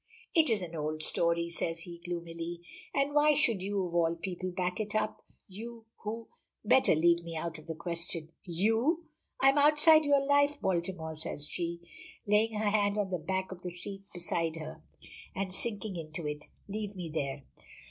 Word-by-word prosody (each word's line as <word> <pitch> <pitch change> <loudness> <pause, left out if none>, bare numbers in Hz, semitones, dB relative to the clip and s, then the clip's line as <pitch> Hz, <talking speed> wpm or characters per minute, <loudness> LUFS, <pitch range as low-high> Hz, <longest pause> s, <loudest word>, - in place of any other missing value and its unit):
"It 320 -5 +5
is 215 -4 +1
an 170 -1 -6
old 155 0 -2
story," 170 +1 +2
says 165 0 -2
he 170 0 -9
gloomily, 170 -1 -5 0.3
"and 280 +1 +1
why 300 0 +5
should 230 -9 +3
you, 200 0 0
of 170 - -5
all 170 -1 +3
people, 185 +1 -4
back 180 +1 -2
it 210 0 -3
up? 215 0 -1 0.2
You 225 +4 -9
who 225 +2 -5 0.2
" - - -35
"Better 255 -4 +5
leave 170 +2 +4
me 165 -1 -5
out 165 0 -3
of 155 - -15
the 160 - -3
question." 170 -1 -3
"You!" 225 - +1 0.3
"I 270 - +7
am 280 +2 +4
outside 305 +2 +7
your 285 -1 +4
life, 285 +1 +4
Baltimore," 170 -3 -1
says 150 -1 -4
she, 170 +1 -3 0.4
laying 210 +2 +3
her 210 -1 +1
hand 205 -1 +2
on 200 -2 0
the 180 - 0
back 190 +4 -2
of 185 -1 -8
the 180 - -4
seat 195 +3 -6
beside 170 -2 -1
her, 155 - -7 0.5
and 190 -1 -2
sinking 210 -1 -3
into 160 0 -6
it. 150 0 -4 0.2
"Leave 205 0 -4
me 175 -4 -5
there!" 140 -2 -2
185 Hz, 185 wpm, -31 LUFS, 170-215 Hz, 0.5 s, I